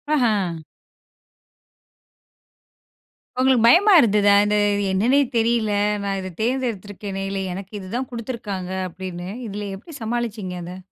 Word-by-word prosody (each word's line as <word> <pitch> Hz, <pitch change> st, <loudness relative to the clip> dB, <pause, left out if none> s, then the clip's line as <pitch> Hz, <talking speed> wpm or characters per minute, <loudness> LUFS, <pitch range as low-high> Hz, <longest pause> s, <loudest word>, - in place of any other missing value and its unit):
அஹ்ம். 205 Hz, -, +1 dB, 2.8 s
உங்களுக்கு 255 Hz, -3 st, +4 dB
பயமா 385 Hz, -, +6 dB
இருந்ததா? 205 Hz, -2 st, +4 dB
"இத 210 Hz, 0 st, +1 dB, 0.4 s
என்னன்னே 230 Hz, +9 st, +3 dB, 0.2 s
தெரியல. 225 Hz, -2 st, +1 dB, 0.3 s
நான் 195 Hz, -1 st, -1 dB
இத 185 Hz, -, -5 dB
தேர்ந்தெடுத்துருக்கேனே! 205 Hz, -5 st, -3 dB
இல்ல, 195 Hz, 0 st, -3 dB
எனக்கு 195 Hz, +2 st, -8 dB
இதுதான் 235 Hz, +7 st, -4 dB
குடுத்துருக்காங்க." 220 Hz, -6 st, -5 dB, 0.2 s
அப்படின்னு. 175 Hz, 0 st, -7 dB, 0.2 s
இதுல 205 Hz, 0 st, -5 dB
எப்படி 310 Hz, -, -12 dB
சமாளிச்சீங்க 220 Hz, -5 st, -3 dB
அத? 180 Hz, +2 st, -8 dB
210 Hz, 105 wpm, -22 LUFS, 190-240 Hz, 2.8 s, பயமா